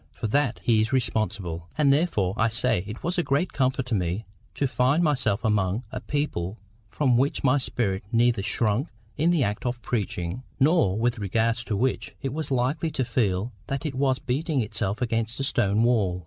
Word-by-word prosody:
For - - -7
that 125 +2 +1
he 110 -2 +3
is 110 +4 -1
responsible. 105 -9 -1
And 145 -3 +5
therefore, 125 - +1
I 115 +1 +2
say, 110 -5 +1
it 110 +3 -8
was 175 +2 0
a - - +2
great 155 +6 0
comfort 130 -1 +1
to 125 - -4
me 95 +2 -1 0.3
to 145 - 0
find 135 +5 +2
myself 125 -9 +1
amongst 105 +1 +1
a 130 - -4
people 115 - -2 0.3
from 130 0 +2
which 135 +3 +1
my 135 +1 +4
spirit 100 -7 -2
neither 120 -2 +3
shrunk 110 - +1 0.3
in 160 +3 +2
the 170 -6 +3
act 105 -2 -2
of 120 -1 -2
preaching, 100 -3 -2 0.2
nor 140 - +3
with 120 +1 0
regard 110 +3 +1
to 115 -4 -3
which 130 +5 -1
it 135 -1 -2
was 155 -1 -3
likely 135 +5 0
to 135 -4 -2
feel 115 -2 0
that 135 +3 -3
it 150 - -2
was 130 0 +1
beating 145 +4 -1
itself 105 0 -2
against 115 0 -1
a - - 0
stone 110 -5 +2
wall. 105 -7 +2
120 Hz, 190 wpm, -26 LUFS, 105-135 Hz, 0.3 s, And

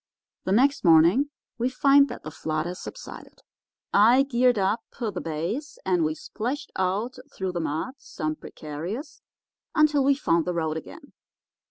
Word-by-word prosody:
"The 185 - -1
next 270 +7 +3
morning 175 - +5 0.3
we 245 +2 +1
find 275 +2 +5
that 245 - -8
the 155 - -7
flood 155 0 -2
has 180 +1 -5
subsided. - - -10 0.5
I 235 +6 +6
geared 250 -3 +2
up 200 +4 +1 0.2
the 230 -4 -1
bays, 170 - -4
and 180 -3 +2
we 155 0 0
splashed 245 - -5
out 200 +7 -1
through 190 -1 -3
the 175 - -3
mud, 160 - -2
some 155 -9 -4
precarious, 170 - -7 0.5
until 305 -3 +4
we 280 +1 +4
found 170 - +1
the 180 - -2
road 160 -2 -1
again. 285 - -9
205 Hz, 155 wpm, -26 LUFS, 165-265 Hz, 0.5 s, I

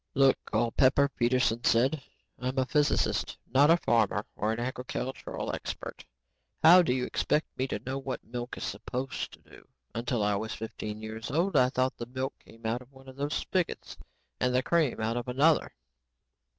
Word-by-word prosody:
"Look, 135 -1 +5
Culpepper," 130 +5 +3
Peterson 120 -2 +1
said, 130 +6 +3 0.4
"I'm 130 +2 -3
a 130 - +3
physicist, 150 +2 +1 0.2
not 140 +3 +6
a 165 - +7
farmer 110 - +1
or 105 +1 0
an 115 - -2
agricultural 125 +1 -4
expert. - - -6 0.6
How 175 +3 +9
do 170 - +1
you 125 0 0
expect 155 - 0
me 130 - -1
to - - -2
know 130 +1 -2
what 135 -1 -5
milk 120 +1 -6
is - - -5
supposed 130 +1 -4
to - - -15
do? - - -17 0.3
Until 115 -1 -1
I 105 0 +2
was 110 +2 -4
fifteen 110 -1 -6
years 110 0 -6
old, 170 +8 +1
I 125 - +5
thought 130 0 0
the 120 - -6
milk 130 +2 -3
came 115 0 -17
out 115 +3 -1
of 125 +1 -16
one 135 0 -17
of 130 - -10
those 145 +2 -2
spigots 185 -3 -2 0.4
and 125 0 +1
the 130 - +3
cream 165 -7 +1
out 115 +2 -1
of 120 - -4
another." 145 +6 +3
130 Hz, 180 wpm, -29 LUFS, 115-135 Hz, 0.6 s, How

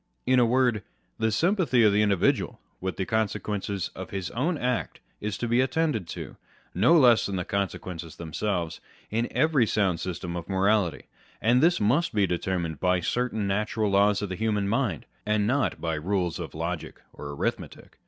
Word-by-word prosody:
In 130 0 +4
a 120 - +4
word, 120 -3 +2 0.4
the 110 0 +1
sympathy 165 - +2
of 105 -2 +5
the 105 - +3
individual 100 -4 +1 0.2
with 95 0 -4
the 95 - -1
consequences 105 -3 -2
of - - -7
his 95 -2 -4
own 155 +8 0
act 125 -3 -2 0.2
is 105 -1 -3
to 120 - -2
be 120 +2 +3
attended 130 - 0
to - - -7 0.4
(no 120 - +5
less 120 -6 +5
than 100 - -3
the 90 -1 -2
consequences 90 -4 -4
themselves) 85 +1 -3 0.3
in 115 +2 0
every 150 -7 +2
sound 95 -6 +1
system 90 0 -4
of 85 +1 -6
morality; 95 -2 +1 0.3
and 120 +3 +3
this 170 +2 +4
must 125 +8 +1
be 100 -2 +4
deter 90 +1 -1
mined 80 -4 -4
by 90 +1 +2
certain 110 +3 -1
natural 105 +1 0
laws 100 +1 +3
of 100 - -3
the 95 - -3
human 105 -1 0
mind, 110 - -1 0.2
and 105 -1 +1
not 130 +5 0
by 80 -1 -2
rules 90 +2 -1
of 80 -5 -6
logic 85 +1 -4
or 70 - -8
arithmetic. 70 - -4
105 Hz, 180 wpm, -27 LUFS, 90-120 Hz, 0.4 s, of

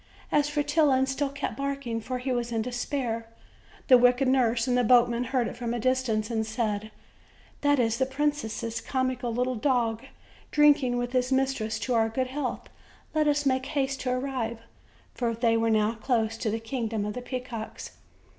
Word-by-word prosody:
As 295 0 +3
Fretillon 295 -2 +2
still 270 +1 -1
kept 280 +1 -4
barking, 275 -5 -3
for 255 +3 -3
he 255 +1 -3
was 240 -1 -1
in 225 -1 0
despair, 245 -2 -3 0.6
the 255 -2 +8
wicked 250 +2 +4
nurse 245 -3 +2
and 250 - +2
the 250 - +3
boatman 240 0 +4
heard 250 -2 0
it - - -6
from 240 0 -3
a - - -2
distance, 245 -3 0
and 220 -1 0
said: 215 -1 -2 0.7
"That 285 0 +3
is 230 -2 +1
the 260 - +2
princess' 265 -5 -2
comical 255 -2 -1
little 250 +2 0
dog 230 -2 0 0.5
drinking 290 -4 +4
with 245 0 -2
his 255 0 0
mistress 265 -5 0
to 255 - -1
our 225 -1 +3
good 255 +3 -1
health; 265 -1 -4 0.5
let 310 -1 +2
us 290 0 +2
make 260 -1 +1
haste 275 -2 -1
to 255 - -2
arrive;" 250 -3 -2 0.5
for 235 -2 -1
they 230 0 +2
were 225 0 +2
now 215 0 +2
close 225 -1 0
to 225 - -1
the 225 +2 -1
kingdom 225 -2 -3
of 210 - -3
the 250 - -5
peacocks. 250 -3 -6
250 Hz, 180 wpm, -27 LUFS, 230-265 Hz, 0.7 s, the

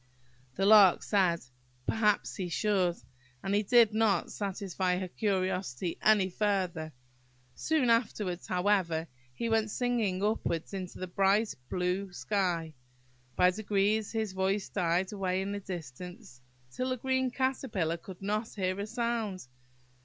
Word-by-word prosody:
The 195 - 0
Lark 205 -3 +7
said, 185 -5 +2 0.4
"Perhaps 210 -2 +1
he 185 -2 -3
should;" 185 -1 +1 0.5
but 195 - -1
he 205 - +3
did 225 0 +5
not 215 -5 +2
satisfy 190 -2 -2
her 185 0 -3
curiosity 185 - -2
any 210 -3 +4
further. 185 -5 -1 0.6
Soon 290 - +1
afterwards, 210 -6 0
however, 180 -3 +1 0.2
he 125 - -3
went 225 -1 +1
singing 220 -6 0
upwards 205 -5 -1
into 185 -2 -5
the 185 - -4
bright, 195 +4 +2 0.2
blue 180 +2 -1
sky. 175 -5 -1 0.6
By 180 0 +5
degrees 205 +1 0
his 220 -4 -2
voice 190 +1 0
died 180 +1 0
away 190 -2 -1
in 195 +1 -2
the 205 - -3
distance, 180 - -8 0.3
till 255 - -2
the 255 - -1
green 260 +1 0
Caterpillar 250 -10 -1
could 185 +2 -11
not 215 +3 -1
hear 185 -1 -1
a 200 - -3
sound. 225 - -2
195 Hz, 135 wpm, -30 LUFS, 180-215 Hz, 0.6 s, Lark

